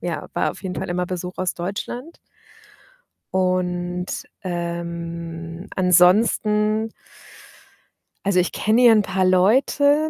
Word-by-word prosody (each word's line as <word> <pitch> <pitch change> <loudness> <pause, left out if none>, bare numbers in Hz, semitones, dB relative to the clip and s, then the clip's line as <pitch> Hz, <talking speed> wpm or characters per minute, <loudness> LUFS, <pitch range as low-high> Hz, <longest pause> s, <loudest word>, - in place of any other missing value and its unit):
ja, - - -4
war - - 0
auf - - -12
jeden 185 -1 -4
Fall 190 - -4
immer 180 0 -1
Besuch 180 0 -5
aus 185 -1 -1
Deutschland. 210 - -5 1.2
Und, 180 -1 -1 0.3
ähm, 170 0 -5
ansonsten 210 +4 +3 1.4
also, 195 -2 +3
ich 180 - +1
kenne 220 +4 +2
hier 240 - +8
'n 215 -1 +5
paar 190 -1 -1
Leute. 275 +11 +3
185 Hz, 115 wpm, -22 LUFS, 175-210 Hz, 1.4 s, hier